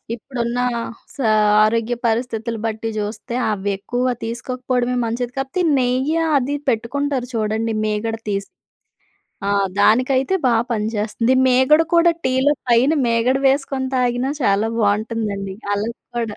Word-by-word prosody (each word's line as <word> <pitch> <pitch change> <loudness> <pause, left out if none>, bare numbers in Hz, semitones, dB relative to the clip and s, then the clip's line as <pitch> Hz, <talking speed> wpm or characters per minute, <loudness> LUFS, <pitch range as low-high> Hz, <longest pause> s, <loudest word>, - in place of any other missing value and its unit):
ఇప్పుడున్న 240 0 -4 0.6
స - - -18 0.5
ఆరోగ్య 230 +2 +1
పరిస్థితులు 230 0 -1
బట్టి 225 +1 -3
జూస్తే 215 +2 -4 0.2
అవి 205 -1 -2
ఎక్కువగా 245 +5 -1
తీసుకోకపోవడమే 250 +1 -2
మంచిది. 240 +2 -3
కాపోతే 270 +7 -2 0.2
నెయ్య 260 +5 +1 0.2
అది 275 +2 -2
పెట్టుకుంటారు 255 +3 -1
చూడండి 220 +1 -1
మీగడ 215 +1 -1
తీస్ 200 -1 -2 1.0
ఆ! - - 0 0.3
దానికైతే 260 - +3
బాగా 235 -2 +3
పనిచేస్తుంది. 220 +2 0
మీగడ 260 +5 +5
కూడా, 340 0 +6 0.2
టీలో 260 +3 +3 0.2
పైన 245 +5 +4
మీగడ 235 +3 +2
వేసుకొని 270 -1 0
తాగినా 250 +1 0
చాలా 205 0 +2
బావుంటుందండి 205 -2 -1 0.2
అలాగ 215 +3 -2 0.2
కూడా. 225 -3 -2
235 Hz, 115 wpm, -20 LUFS, 220-255 Hz, 1.0 s, కూడా